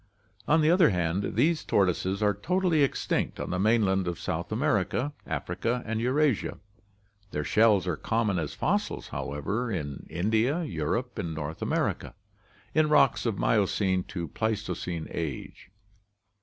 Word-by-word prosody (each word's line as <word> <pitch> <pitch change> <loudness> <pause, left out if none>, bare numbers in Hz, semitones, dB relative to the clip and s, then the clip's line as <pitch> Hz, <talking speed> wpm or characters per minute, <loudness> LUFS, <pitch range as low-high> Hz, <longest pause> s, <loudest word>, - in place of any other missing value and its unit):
On 160 +2 +4
the 155 +1 +4
other 175 -2 +6
hand, 90 +1 -1
these 155 +8 +2
tortoises 95 +1 +1
are 105 -1 +3
totally 175 - +1
extinct 140 - 0
on - - -4
the 90 - -1
mainland 100 -3 +2
of 85 -2 -3
South 85 +4 -3
America, 125 - 0
Africa, 120 +2 -2
and 115 0 -2
Eurasia. 130 0 +1 0.7
Their 75 -4 -3
shells 105 +2 +4
are 90 -4 -1
common 110 -5 0
as 75 -3 -4
fossils, - - -1
however, 100 - -3
in 70 -7 -4
India, 110 - +1
Europe, 115 - -2
and 85 -5 -3
North 80 +1 -5
America, - - -1 0.6
in 155 -1 +3
rocks 150 - +4
of 110 -4 -1
Miocene 95 -3 +1
to 85 -3 -5
Pleistocene 95 -6 -3
age. 80 +2 -5
105 Hz, 140 wpm, -28 LUFS, 90-125 Hz, 0.7 s, other